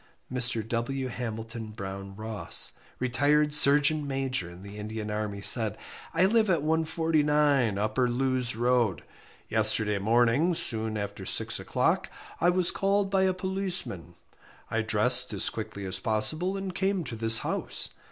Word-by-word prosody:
Mr. 120 Hz, -3 st, +2 dB
W. 130 Hz, +3 st, -3 dB
Hamilton 115 Hz, -1 st, -6 dB
Brown 100 Hz, -2 st, -8 dB
Ross, 110 Hz, 0 st, +2 dB, 0.3 s
retired 145 Hz, +4 st, +1 dB
surgeon 150 Hz, +1 st, +5 dB
major 135 Hz, -9 st, -3 dB
in 90 Hz, +2 st, -13 dB
the 100 Hz, +1 st, -11 dB
Indian 105 Hz, 0 st, -6 dB
army, 105 Hz, -1 st, -4 dB
said 110 Hz, -3 st, +4 dB, 0.3 s
I 170 Hz, +3 st, +2 dB
live 215 Hz, +1 st, +2 dB
at 165 Hz, -5 st, +1 dB
149, 150 Hz, -, +1 dB
Upper 110 Hz, +5 st, -1 dB
Lewes 125 Hz, -1 st, -1 dB
Road. 120 Hz, -5 st, 0 dB, 0.4 s
Yesterday 110 Hz, -1 st, +3 dB
morning, 120 Hz, -, +2 dB
soon 110 Hz, -6 st, +5 dB
after 100 Hz, -1 st, -6 dB
six -, -, 0 dB
o'clock, -, -, -1 dB, 0.3 s
I 175 Hz, -, +3 dB
was 180 Hz, -1 st, +3 dB
called 195 Hz, 0 st, -1 dB
by 190 Hz, -1 st, +2 dB
a 185 Hz, -, +1 dB
policeman. 185 Hz, -, -3 dB, 0.6 s
I 115 Hz, -, 0 dB
dressed 110 Hz, +3 st, 0 dB
as 100 Hz, -, +3 dB
quickly 105 Hz, -3 st, -7 dB
as 95 Hz, 0 st, 0 dB
possible 115 Hz, -, 0 dB
and 195 Hz, -1 st, -5 dB
came 190 Hz, -1 st, -1 dB
to 125 Hz, -, -7 dB
this 115 Hz, 0 st, +2 dB
house. -, -, -3 dB
120 Hz, 140 wpm, -27 LUFS, 110-150 Hz, 0.6 s, surgeon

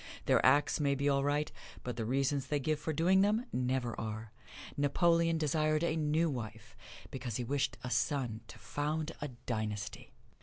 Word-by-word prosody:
Their -, -, +4 dB
acts 145 Hz, +4 st, +4 dB
may 140 Hz, -2 st, +2 dB
be 140 Hz, +1 st, 0 dB
all 140 Hz, -1 st, +3 dB
right, 145 Hz, +1 st, 0 dB, 0.3 s
but 125 Hz, -2 st, -4 dB
the 115 Hz, -1 st, -3 dB
reasons 135 Hz, +3 st, 0 dB
they 145 Hz, -, 0 dB
give 150 Hz, +2 st, 0 dB
for 160 Hz, -, -2 dB
doing 180 Hz, +5 st, +4 dB
them 215 Hz, +4 st, +2 dB
never 125 Hz, -1 st, 0 dB
are. 110 Hz, 0 st, -5 dB, 0.4 s
Napoleon 165 Hz, +3 st, +3 dB
desired 155 Hz, 0 st, +1 dB
a 165 Hz, -2 st, +1 dB
new 155 Hz, +1 st, +2 dB
wife, 115 Hz, -6 st, -6 dB, 0.4 s
because 125 Hz, -4 st, -4 dB
he 125 Hz, -, -1 dB
wished 135 Hz, -1 st, -1 dB
a 125 Hz, -, -4 dB
son 125 Hz, -7 st, 0 dB
to -, -, -11 dB
found 150 Hz, +2 st, -2 dB
a 145 Hz, -, -2 dB
dynasty. 110 Hz, -5 st, -4 dB
140 Hz, 175 wpm, -33 LUFS, 125-155 Hz, 0.4 s, Their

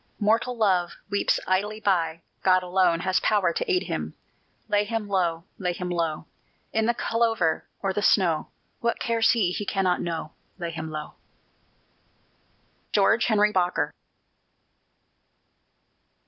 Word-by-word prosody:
Mortal 230 Hz, +3 st, +1 dB
love 185 Hz, -5 st, +2 dB, 0.2 s
weeps 200 Hz, -, +2 dB
idly 205 Hz, +3 st, 0 dB
by: 165 Hz, -5 st, 0 dB, 0.2 s
God 185 Hz, -1 st, +4 dB
alone 180 Hz, -2 st, +2 dB
has 185 Hz, 0 st, +1 dB
power 195 Hz, -5 st, +2 dB
to -, -, -2 dB
aid 365 Hz, -1 st, +2 dB
him. -, -, -4 dB, 0.5 s
Lay 205 Hz, 0 st, +2 dB
him 215 Hz, 0 st, -3 dB
low, 175 Hz, -4 st, 0 dB, 0.2 s
lay 180 Hz, -2 st, -1 dB
him 180 Hz, 0 st, -4 dB
low, 165 Hz, -2 st, -1 dB, 0.5 s
In 220 Hz, 0 st, +1 dB
the 240 Hz, -, +2 dB
clover 225 Hz, -10 st, 0 dB, 0.2 s
or 195 Hz, -1 st, 0 dB
the 205 Hz, -, -1 dB
snow! 175 Hz, -7 st, +3 dB, 0.3 s
What 235 Hz, 0 st, -1 dB
cares 230 Hz, -1 st, +3 dB
he? 205 Hz, -7 st, +1 dB
he 205 Hz, -, -3 dB
cannot 190 Hz, -3 st, 0 dB
know: 165 Hz, -2 st, -4 dB, 0.3 s
Lay 170 Hz, -2 st, -4 dB
him 160 Hz, -1 st, -5 dB
low! 155 Hz, -1 st, -6 dB, 1.8 s
GEORGE 220 Hz, +3 st, +4 dB
HENRY 210 Hz, -2 st, +3 dB
BOKER. 180 Hz, -2 st, 0 dB
190 Hz, 135 wpm, -25 LUFS, 175-215 Hz, 1.8 s, God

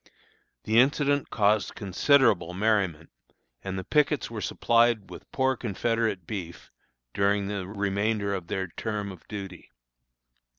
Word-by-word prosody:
The 110 Hz, +2 st, +3 dB
incident 145 Hz, +2 st, +2 dB
caused 105 Hz, -1 st, +1 dB
considerable 100 Hz, -, +2 dB
merriment, 95 Hz, -6 st, 0 dB, 0.5 s
and 95 Hz, -1 st, -4 dB
the 95 Hz, -, -4 dB
pickets 150 Hz, -1 st, +1 dB
were 110 Hz, -2 st, -5 dB
supplied 115 Hz, -5 st, +2 dB
with -, -, -11 dB
poor 130 Hz, 0 st, +1 dB
Confederate 115 Hz, -4 st, -1 dB
beef 90 Hz, -3 st, -7 dB, 0.4 s
during 100 Hz, 0 st, +1 dB
the 100 Hz, -2 st, -4 dB
remainder 100 Hz, +1 st, -1 dB
of 90 Hz, -3 st, -4 dB
their 95 Hz, -1 st, -2 dB
term 105 Hz, +2 st, -4 dB
of 90 Hz, -, -14 dB
duty. 95 Hz, -4 st, -8 dB
100 Hz, 125 wpm, -27 LUFS, 95-115 Hz, 0.5 s, The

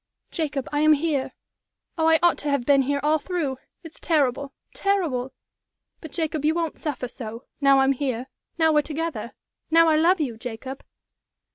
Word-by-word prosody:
"Jacob, 295 Hz, -5 st, -3 dB
I 290 Hz, -, 0 dB
am 310 Hz, 0 st, +6 dB
here! 295 Hz, -3 st, -1 dB, 0.6 s
Oh, 320 Hz, -1 st, +1 dB
I 325 Hz, 0 st, +6 dB
ought 345 Hz, -, +4 dB
to 290 Hz, -, -2 dB
have 280 Hz, -4 st, 0 dB
been 280 Hz, 0 st, +5 dB
here 280 Hz, +2 st, 0 dB
all 310 Hz, +1 st, +3 dB
through! 295 Hz, -6 st, -3 dB, 0.2 s
It's 325 Hz, -1 st, -11 dB
terrible 280 Hz, -3 st, +1 dB, 0.2 s
terrible! 325 Hz, -11 st, 0 dB, 0.7 s
But, 315 Hz, -, -10 dB
Jacob, 315 Hz, -3 st, -2 dB
you 310 Hz, +2 st, +2 dB
won't 335 Hz, -2 st, -2 dB
suffer 285 Hz, -5 st, -3 dB
so 230 Hz, 0 st, -8 dB, 0.2 s
now 275 Hz, -1 st, +5 dB
I'm 270 Hz, 0 st, +4 dB
here 260 Hz, -3 st, -2 dB, 0.3 s
now 320 Hz, -1 st, +3 dB
we're 300 Hz, -, +5 dB
together 320 Hz, +2 st, -4 dB, 0.4 s
now 330 Hz, 0 st, +5 dB
I 310 Hz, -, +4 dB
love 345 Hz, +4 st, +4 dB
you, 250 Hz, -7 st, -2 dB
Jacob?" 250 Hz, +3 st, -7 dB
295 Hz, 170 wpm, -24 LUFS, 270-320 Hz, 0.7 s, am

